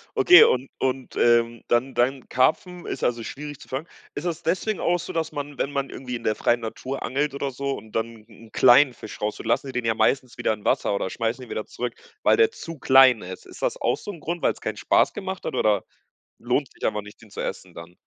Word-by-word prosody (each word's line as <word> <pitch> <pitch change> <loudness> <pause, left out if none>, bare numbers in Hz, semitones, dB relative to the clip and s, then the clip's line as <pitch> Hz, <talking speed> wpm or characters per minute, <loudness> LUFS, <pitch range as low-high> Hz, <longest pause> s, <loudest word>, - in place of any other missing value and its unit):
Okay, 390 -4 +8
und 130 +1 +2
und, 130 0 -2
ähm, 115 -1 +3
dann 125 +3 +1
dann 130 +2 0
Karpfen 175 +7 +1
ist - - -5
also 120 -1 0
schwierig 145 +3 -7
zu - - -14
fangen. 135 +5 -4 0.3
Ist 145 - -5
es 170 -3 -3
deswegen 190 +5 -1
auch 175 +1 +1
so, - - -7
dass 165 -1 -2
man, 145 -1 -6
wenn 140 - -1
man 140 -1 -2
irgendwie 125 -1 -6
in 115 - -7
der 110 - +1
freien 120 +2 +1
Natur 130 +4 -5
angelt 140 +2 -1
oder 140 0 -2
so 140 +2 -3
und 110 -4 -7
dann 115 -1 -3
'n 115 - -16
'n - - -24
kleinen 125 +5 +6
Fisch 110 - -10
rausholt, 105 +1 -3
lassen 120 +4 +1
die 130 - -7
den 125 -1 -2
ja 115 -1 +1
meistens 130 +1 +1
wieder 120 -2 +1
in 105 -1 -10
Wasser - - +1
oder 100 -1 -1
schmeißen 115 +5 -2
den 125 - -10
wieder 110 - -4
zurück, 120 -1 -5 0.3
weil - - +5
der 445 0 +4
zu 165 - -8
klein 130 -4 +6
ist. 95 +1 -9
Ist - - -13
das - - -1
auch - - +1
so 205 - -7
'n 175 - -11
Grund, 170 +3 -4
weil's - - 0
keinen - - -4
Spaß - - +3
gemacht 190 -2 -6
hat - - -3
oder 105 -5 +2 0.6
lohnt 125 +3 -1
sich - - -10
einfach 105 -1 -1
nicht, 105 +2 -14
den 110 - -16
zu - - -7
essen - - -5
dann? 85 +2 -11
130 Hz, 245 wpm, -24 LUFS, 115-145 Hz, 0.6 s, Okay